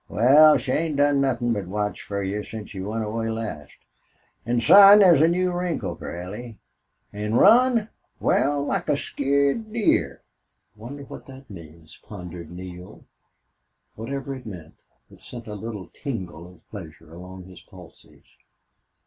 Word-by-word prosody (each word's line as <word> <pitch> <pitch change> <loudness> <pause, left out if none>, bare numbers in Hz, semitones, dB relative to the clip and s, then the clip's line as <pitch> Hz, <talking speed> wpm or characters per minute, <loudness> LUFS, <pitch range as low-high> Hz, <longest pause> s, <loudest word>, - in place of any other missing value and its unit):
"Wal, 145 - +6
she 130 - -4
ain't 155 +1 -1
done 145 0 +2
nothin' 120 -3 0
but 100 -4 -4
watch 105 +2 -3
fer 100 -1 -4
you 100 +2 -3
since 110 0 -9
you 95 +1 -6
went 110 +1 -3
away 115 +1 -3
last. 110 -10 -6 0.7
An', 120 0 +1
son, 200 - +8
thet's 180 -8 +6
a 160 - +5
new 180 +2 0
wrinkle 175 -2 -3
fer 85 - -8
Allie, 110 +4 -9 0.6
An' 105 +2 -3
run? 235 - +5 0.3
Wal, 145 0 +1
like - - -2
a 140 - +2
skeered 140 +11 -1
deer." 225 -2 0 0.5
"Wonder 125 +7 -9
what - - -12
that 135 -2 -13
means?" 80 -3 -13
pondered 90 -4 -10
Neale. 90 0 -11 0.9
Whatever 135 +4 -6
it 130 -3 -10
meant, 85 -6 -11 0.3
it - - -18
sent 120 -2 -10
a 105 - -8
little 105 -3 -8
tingle 95 - -7
of 90 - -23
pleasure 80 -5 -11
along 90 +2 -11
his 90 -1 -14
pulses. 90 -3 -17
115 Hz, 150 wpm, -23 LUFS, 95-140 Hz, 0.9 s, son